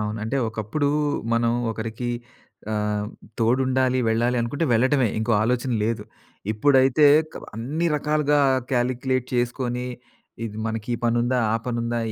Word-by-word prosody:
అవును. 105 +1 -3
అంటే 125 +5 -1
ఒకప్పుడు 110 +7 -1 0.5
మనం 115 0 +2 0.2
ఒకరికి 115 +2 -4 0.6
ఆహ్, 105 -1 -1 0.3
తోడుండాలి 130 +2 +2
వెళ్ళాలి 120 +2 +1
అనుకుంటే 140 +7 -1
వెళ్లటమే 130 +2 +3
ఇంకో 110 +1 0
ఆలోచన 125 +2 0
లేదు. 115 0 -2 0.5
ఇప్పుడైతే 135 +4 +4 0.3
క - - -17
బ - - -8
అన్ని 150 +9 -2
రకాలుగా 150 0 +1 0.3
కాలిక్యులేట్ 130 +1 0
చేసుకొని 125 0 -1 0.6
ఇది 110 -2 -6
మనకి 110 0 -4
ఈ - - -1
పనుందా? 120 +2 +2
ఆ - - +2
పనుందా? 120 -1 -1
120 Hz, 130 wpm, -24 LUFS, 115-130 Hz, 0.6 s, ఇప్పుడైతే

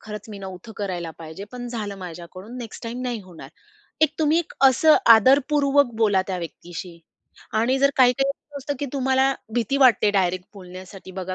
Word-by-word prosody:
खरंच 210 +1 -9
मी 210 -2 -8
नव्हत 190 +2 -9
करायला 180 -5 -4
पाहिजे. 160 +4 -8
पण 245 -1 -6
झालं 210 -4 -5
माझ्याकडून. 185 +6 -9
नेक्स्ट 230 -3 -9
टाईम 240 +2 -5
नाही 245 -3 -3
होणार." 170 -7 -12 0.5
एक 315 -1 +3
तुम्ही 315 +1 +3
एक 340 - -4 0.2
असं 310 +4 +5 0.2
आदरपूर्वक 280 +2 +3
बोला 205 -4 +3
त्या 185 -1 -2
व्यक्तीशी 170 0 -8 0.5
आणि 235 +5 +1
जर 280 +1 +4
काही-काही 265 +2 +4
असं - - -63 0.2
असतं 285 +1 -4
की 285 - -3
तुम्हाला 265 0 +2 0.2
भीती 240 +3 0
वाटते 245 -6 +5
डायरेक्ट 185 -2 0
बोलण्यासाठी 185 0 -11
बघा 185 0 -5
220 Hz, 170 wpm, -23 LUFS, 185-265 Hz, 0.5 s, असं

